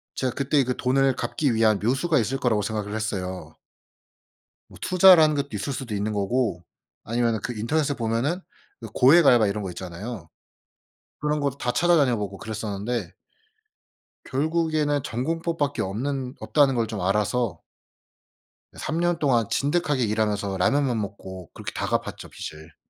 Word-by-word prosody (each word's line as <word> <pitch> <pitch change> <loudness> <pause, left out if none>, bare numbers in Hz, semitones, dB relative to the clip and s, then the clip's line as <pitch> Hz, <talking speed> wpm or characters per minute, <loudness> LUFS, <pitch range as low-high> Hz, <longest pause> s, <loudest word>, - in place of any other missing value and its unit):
제가 130 -2 -1
그때 140 +1 +2
그 125 0 -2
돈을 135 +1 +2
갚기 140 -6 0
위한 110 -2 +3
묘수가 135 +8 +1
있을 120 +5 -1
거라고 120 -6 +1
생각을 105 0 -3
했어요. 95 -4 -4 1.1
뭐 - - -15
투자라는 180 -4 +6
것도 140 0 -2
있을 105 +7 -3
수도 125 -4 -5
있는 105 +2 -2
거고 105 -2 -1 0.4
아니면은 115 -1 0
그 120 - -3
인터넷에 145 +6 0
보면은 120 +10 -1 0.4
그 115 - -6
고액 150 +6 +6
알바 120 -5 +6
이런 100 +1 -2
거 95 - -4
있잖아요. 90 +2 -7 0.9
그런 150 0 0
거 145 -1 +1
다 125 - -1
찾아다녀보고 125 - +2
그랬었는데 105 -1 -4 1.1
결국에는 155 0 0
'정공법밖에 150 +3 -2
없는 130 +6 -3
없다.'는 140 -3 +3
걸 115 -2 0
좀 105 -3 -5
알아서 105 +3 0 1.1
예 - - -16
3 160 - -2
년 175 -1 +1
동안 120 -7 +2
진득하게 145 -2 +1
일하면서 105 -3 -1
라면만 130 +4 +2
먹고 95 -4 -7
그렇게 - - -6
다 - - -2
갚았죠 - - -3
빚을. 80 0 -9
120 Hz, 325 characters per minute, -25 LUFS, 105-145 Hz, 1.1 s, 투자라는